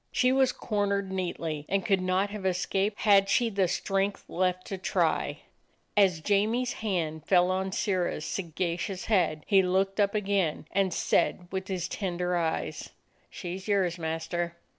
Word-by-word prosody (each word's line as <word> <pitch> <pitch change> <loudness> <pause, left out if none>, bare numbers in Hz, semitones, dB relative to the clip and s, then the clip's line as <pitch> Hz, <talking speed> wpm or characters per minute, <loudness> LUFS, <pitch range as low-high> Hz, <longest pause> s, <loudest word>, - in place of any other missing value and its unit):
She 250 -1 +3
was 265 -1 +3
cornered 200 -3 -1
neatly 165 -5 -3
and 195 -1 0
could 195 -2 +2
not 185 +2 +1
have 210 -2 -6
es 185 -1 0
caped 200 +2 -1
had 200 -2 +5
she 235 +1 +2
the 195 -2 +2
strength 195 +3 -1
left 185 0 -1
to 195 - -5
try. - - 0 0.5
As 190 -6 +4
Jamie's 215 +7 +1
hand 165 -8 -2
fell 180 -1 +4
on 190 +1 -1
Sirrah's 185 -6 -1
sagacious 180 +1 -3
head, 170 -8 +1
he 195 -2 +5
looked 190 +2 0
up 200 0 +2
again, 195 -7 0
and 195 -1 +1
said 175 +1 +1
with 190 0 -3
his 180 -3 -2
tender 180 -2 -2
eyes: 165 -2 -2 0.4
"She 180 0 -6
's 190 - -12
yours, 185 -4 +1
master." 170 +1 -3
190 Hz, 160 wpm, -28 LUFS, 175-200 Hz, 0.5 s, had